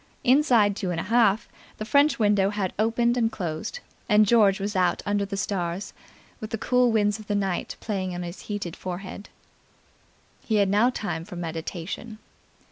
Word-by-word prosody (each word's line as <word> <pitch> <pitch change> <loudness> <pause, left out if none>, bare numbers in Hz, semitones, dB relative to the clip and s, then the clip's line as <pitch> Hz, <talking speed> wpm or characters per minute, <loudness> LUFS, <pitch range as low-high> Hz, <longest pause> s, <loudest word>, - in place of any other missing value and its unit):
Inside 245 -6 +4
two 190 -2 -3
and 170 -2 -2
half, 220 +2 +2 0.3
the 215 - -5
french 285 +5 +3
window 205 -3 +3
had 200 -3 -2
opened 235 +2 +2
and 225 -2 +1
closed, 175 - -5 0.3
and 210 0 +6
George 205 -3 +4
was 200 +1 -3
out 180 -2 +1
under 205 -1 0
the 200 0 -5
stars, 185 -2 -3 0.5
with 215 - -6
the 225 - -3
cool 250 +2 +2
winds 210 -1 +1
of 215 - -12
the 205 - 0
night 195 -3 -2
playing 190 -4 -3
on 175 - -4
his 175 +1 -7
heated 200 -5 -4
forehead. 185 +2 -7 1.1
He 220 - -1
had 200 -2 +3
now 210 +5 +4
time 205 -9 -4
for 180 +1 -10
meditation. 175 +6 -5
205 Hz, 170 wpm, -25 LUFS, 185-225 Hz, 1.1 s, and